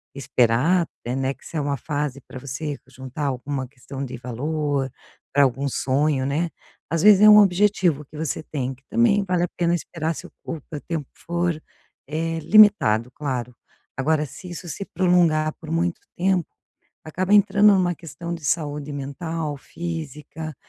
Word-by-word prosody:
esperar 135 +6 +2 0.2
até, 120 - -3
né, 135 0 0
que - - -22
se 165 - -6
é 150 - +1
uma 140 0 -1
fase 145 0 -3
pra 130 - -10
você 140 +3 -5
juntar 130 +2 -6
alguma 135 0 -3
questão 135 +1 -8
de 125 -1 -7
valor 140 +3 -2 0.4
pra 145 +1 +5
algum 135 +1 +1
sonho, 135 +1 +1
né, 155 +5 -1 0.4
às 165 -1 0
vezes 205 -2 +8
é 215 - +9
um 210 0 +10
objetivo 185 -6 +3
que 150 - -16
você 155 -2 -2
tem 135 -4 -4
que 130 - -21
também 215 -3 +3
vale 180 -2 +1
a 180 - -1
pena 170 0 +2
esperar, 165 -1 -3
se - - -8
o - - -12 0.6
tempo 160 -5 -3
for, 170 -2 -2 0.5
eh, 165 +2 -2
limitado, 160 - +5
claro. 125 -3 -4 0.4
Agora, 150 +3 +1
se 180 +6 -11
isso 175 0 -7
se 195 +6 -5
prolongar 170 -4 +2
por 160 - -10
muito 170 +1 0 0.2
tempo, 180 -2 +1 0.6
acaba 185 +5 -1
entrando 205 0 +6
numa 180 -2 +2
questão 170 +1 -7
de 165 -3 -7
saúde 145 0 -1
mental, 150 +2 -4
física, 155 -1 -6
155 Hz, 160 wpm, -23 LUFS, 135-175 Hz, 0.6 s, um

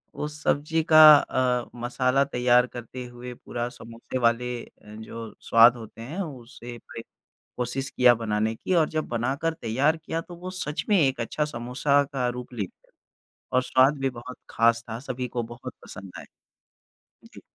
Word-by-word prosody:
वो 150 - -3
सब्ज़ी 150 +1 -1
का 155 - +9 0.2
अ, 125 -3 0
मसाला 125 +3 +1
तैयार 125 -2 +3
करते 125 +1 -8
हुए 120 0 -9
पूरा 120 0 -5
समोसे 115 +1 -8
वाले 120 0 +2 0.2
अ, - - -15 0.3
जो 110 +1 -8
स्वाद 115 +1 +6
होते 115 0 -11
हैं, 145 +11 -6
उसे 125 -6 -8
वही 115 - -10 0.6
कोशिश 125 +2 -3
किया 125 -1 +5
बनाने 110 -1 -1
की 185 - -3
और 160 -3 +3
जब 155 0 -2
बनाकर 135 +8 -1
तैयार 135 +8 +1
किया 160 +1 -4
तो 175 +1 -11
वो 180 +2 -7
सच 150 +2 -3
में 205 - +5
एक 135 -5 +2
अच्छा 150 +6 -1
समोसा 130 +2 +1
का 125 -2 0
रूप 125 0 -8
लेते 100 -6 -7 0.7
और 130 - +3
स्वाद 130 +3 +3
भी 135 0 0
बहुत 125 0 -10
खास 115 0 +2
था। 110 +1 -5
सभी 130 -1 -5
को 120 0 -3
बहुत 125 +1 -9
पसंद 100 -3 -10
आए। - - -11 1.1
जी। - - -12
125 Hz, 170 wpm, -25 LUFS, 120-140 Hz, 1.1 s, का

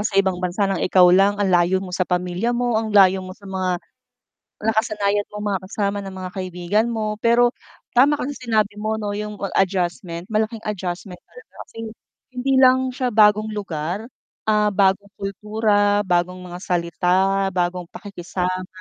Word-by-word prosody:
sa 210 -1 -2
ibang 190 -2 +2
bansa 180 +3 0
ng 195 -2 -1
ikaw 185 0 +5
lang, 195 +2 +4
ang 200 -2 +1
layo 175 +1 +4
mo 180 - -9
sa 185 0 -1
pamilya 180 +6 -1
mo, 240 -2 +1
ang 225 - -4
layo 195 -2 +5
mo 185 0 -9
sa 200 - -19
mga 185 -2 -1 0.9
nakasanayan 210 -2 +1
mong 210 0 -6
mga - - -1
kasama 200 +1 -2
na 195 - -7
mga 185 -1 -6
kaibigan 185 +4 -1
mo. 215 -2 -2
Pero 240 +1 +4 0.4
tama 285 +4 +5
ka - - -2
diyan 290 - -5
sa - - -12
sinabi 215 -2 +2
mo 215 +1 -2
no 205 -1 -3
yung 210 0 -5 0.2
adjustment, 180 -2 -1
malaking 220 +1 -1
adjustment 180 -2 -5
talaga, 475 - -17
kasi - - -19 0.6
hindi 270 +2 0
lang 260 0 +5
siya 255 0 -2
bagong 215 -2 +4
lugar, 180 0 -4 0.4
ah, 210 -1 +2
bagong 200 0 +2
kultura, 205 0 +1
bagong 180 0 0
mga 175 - -7
salita, 185 +2 +1
bagong 180 -1 -1
pakikisama, 185 -2 -4
200 Hz, 165 wpm, -21 LUFS, 185-215 Hz, 0.9 s, ikaw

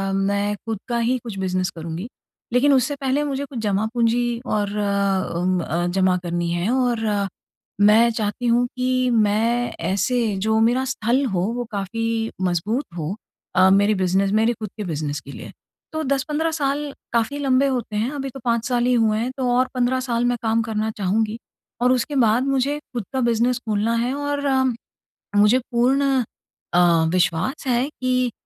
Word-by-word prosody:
मैं 200 +1 0
खुद 225 -3 -3
का 240 - -1
ही 245 +2 +1
कुछ 220 -5 -7
बिजनेस 185 -1 -1
करुँगी। 165 +4 -5 0.5
लेकिन 275 +3 +4
उससे 270 +2 +2
पहले 275 +2 +1
मुझे 280 -1 -2
कुछ 265 -3 -7
जमा-पूँजी 230 +3 0
और 210 -4 0 0.7
उम, 180 +1 +1
अ, 170 +2 -1
जमा 185 0 +2
करनी 175 0 -2
है 175 +4 -1
और 245 -3 +1 0.8
मैं 225 +3 +6
चाहती 220 +2 -3
हूँ 240 +1 +3
कि 255 0 +1
मैं 225 +3 +1
ऐसे 210 +5 0
जो 220 +3 +1
मेरा 245 +3 +3
स्थल 260 +1 0
हो 175 - +1
वो 245 - -3
काफ़ी 225 +3 -2
मजबूत 190 - 0
हो, 165 +4 -3 0.4
अ, 185 +1 +6
मेरे 205 +2 +4
बिजनेस 195 +2 +1
मेरे 225 +2 +3
खुद 215 -2 -7
के 210 - -3
बिजनेस 150 -4 -3
के 140 - -11
लिए। - - -9 0.4
तो 315 - -2
10-15 295 +4 0
साल 290 -1 -1 0.2
काफ़ी 235 +5 +1
लंबे 275 -1 +3
होते 245 -5 -2
हैं, 220 +4 0
अभी 275 -2 -4
तो 270 - -10
5 235 -1 +1
साल 245 -1 +1
ही 250 - +3
हुए 220 -2 +2
हैं 245 +3 -2
तो 255 -2 0
और 255 0 +3
15 255 +1 +1
साल 245 -2 -1
मैं 245 0 +1
काम 225 0 +1
करना 220 -1 -2
चाहूँगी 215 +3 0 0.4
और 250 - +4
उसके 255 +3 0
बाद 225 +4 +3
मुझे 275 +2 +1 0.2
खुद 235 - -2
का 265 - 0
बिजनेस 235 +1 +2
खोलना 215 +2 +1
है 240 +3 0
और 285 0 -2
अ, 265 -1 +3 0.7
मुझे 210 +5 +5
पूर्ण 265 +2 +2 0.5
अ, 175 -2 +4
विश्वास 180 - 0
है 250 +2 +2
कि 255 -3 0
230 Hz, 175 wpm, -22 LUFS, 205-255 Hz, 0.8 s, मैं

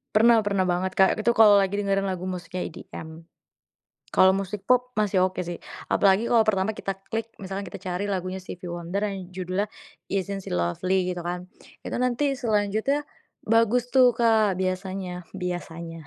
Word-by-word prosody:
Pernah 230 +1 +6
pernah 200 -2 +2
banget 185 +1 -1
Kak, 190 0 +5
itu 235 +2 +2
kalau 210 -2 +7
lagi 195 0 +1
dengerin 195 -1 0
lagu 185 -1 -3
musiknya 180 -1 -4
EDM. 160 -1 -9 0.9
Kalau 190 - +7
musik 195 +1 -2
pop 250 +3 +2
masih 200 -3 +2
oke 185 -1 -4
sih, 175 0 -5 0.3
apalagi 200 +3 +3
kalau 230 -2 +5
pertama 195 -1 +2
kita 195 -2 -4 0.2
klik 225 0 -2 0.2
misalnya 195 +1 -5
kita - - -8
cari 180 +3 -2
lagunya 185 -1 -2
Stevy 180 -1 -8
Wonder 175 +3 -3
yang 195 -2 -6
judulnya 185 +2 -1 0.4
"Isn't 195 0 -3
She - - -3
Lovely" 180 - 0
gitu 180 - -4
kan. 180 +1 -4 0.3
Itu - - -4
nanti 255 +3 +1
selanjutnya 220 +5 +1 0.4
bagus 230 +2 +2
tuh 250 -2 +5
Kak 220 -4 +3
biasanya 185 -1 -3
biasanya. 170 -3 -5
195 Hz, 160 wpm, -25 LUFS, 180-215 Hz, 0.9 s, kalau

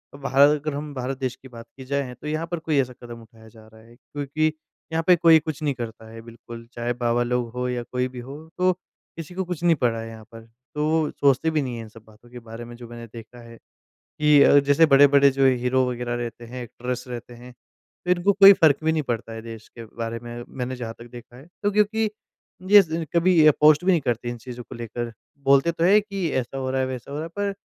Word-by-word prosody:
भार 140 0 +4
अगर 150 0 -1
हम 145 +1 -6
भारत 130 0 -4
देश 130 -1 -3
की 130 - -12
बात 115 -2 -12
की 130 - -10
जाए, 140 -1 -2
तो 125 +5 -10
यहाँ 155 +2 -3
पर 175 0 -4
कोई 160 -2 -1
ऐसा 125 -1 -6
कदम 120 -1 -9
उठाया 110 0 -18
जा 110 0 -17
रहा 110 0 -18
है। 115 +1 -19
क्योंकि 145 +4 -3 0.4
यहाँ 165 0 -1
पे 180 - +7
कोई 165 -1 +6
कुछ 155 0 -6
नहीं 145 -2 0
करता 115 -2 -8
है 115 0 -10
बिल्कुल, 115 0 -12
चाहे 120 +1 -2
बाबा 120 0 0
लोग 120 -1 -1
हों 125 0 -3
या 125 -1 -3
कोई 125 0 -1
भी 130 -1 -10
हो 135 +4 -9 0.2
तो 185 0 +3 0.5
किसी 165 +1 -8
को 190 - -1
कुछ 175 -2 -6
नहीं 170 -1 +4
पड़ा 120 -5 0
है 115 - -6
यहाँ 110 -1 -11
पर। 115 -1 -12 0.3
तो 150 0 0
वो 160 -1 +1
सोचते 140 +3 +2
भी 155 -1 0
नहीं 125 -3 -4
हैं 115 - -6
इन 110 - -12
सब 110 0 -16
बातों 110 +2 -20
के 125 0 -10
बारे 115 0 -10
में। 120 0 -11
जो 120 0 -11
मैंने 120 0 -10
देखा 115 +2 -12
है, 115 0 -13 0.4
कि 150 -1 +2
अ, 145 - +6
जैसे 145 +3 +4
बड़े-बड़े 140 -1 +6
जो 135 0 +2
हीरो 130 0 +2
वगैरह 120 0 -4
रहते 120 -1 -6
हैं, 125 +1 -7
एक्ट्रेस 125 +2 -6
रहते 120 0 -8
हैं, 125 +1 -13 0.5
तो 180 - -2
इनको 180 +3 +3
कोई 200 0 +9
फ़र्क 160 -7 +4
भी 160 - +2
नहीं 160 -1 0
पड़ता 115 -4 -4
है 115 0 -7
देश 115 -1 -10
के 115 - -11
बारे 115 +1 -6
में, 120 0 -8
मैंने 130 0 -5
जहाँ 115 -2 -6
तक 120 - -11
देखा 120 0 -13
है। 135 +4 -14 0.2
तो 205 - +2
क्योंकि 210 +1 +1 0.6
ये 205 0 +10
ज़ 165 -1 -4
कभी 170 -1 +4
अ, 155 - +8
पोस्ट 150 +2 +5
भी 190 - +3
नहीं 170 - +2
करते 120 -3 -2
इन 120 - -6
चीज़ों 125 +1 -9
को - - -9
लेकर। 120 0 -6 0.3
बोलते 140 +4 +4
तो 165 0 -1
हैं 200 +4 +6
कि 195 -4 -3
ऐसा 130 0 -3
हो 130 -1 -3
रहा 130 0 -1
है, 130 - 0
वैसा 130 0 -7
हो 140 - -5
रहा 155 - -4
है, - - -7
पर 205 0 -1
130 Hz, 255 wpm, -23 LUFS, 120-155 Hz, 0.6 s, ये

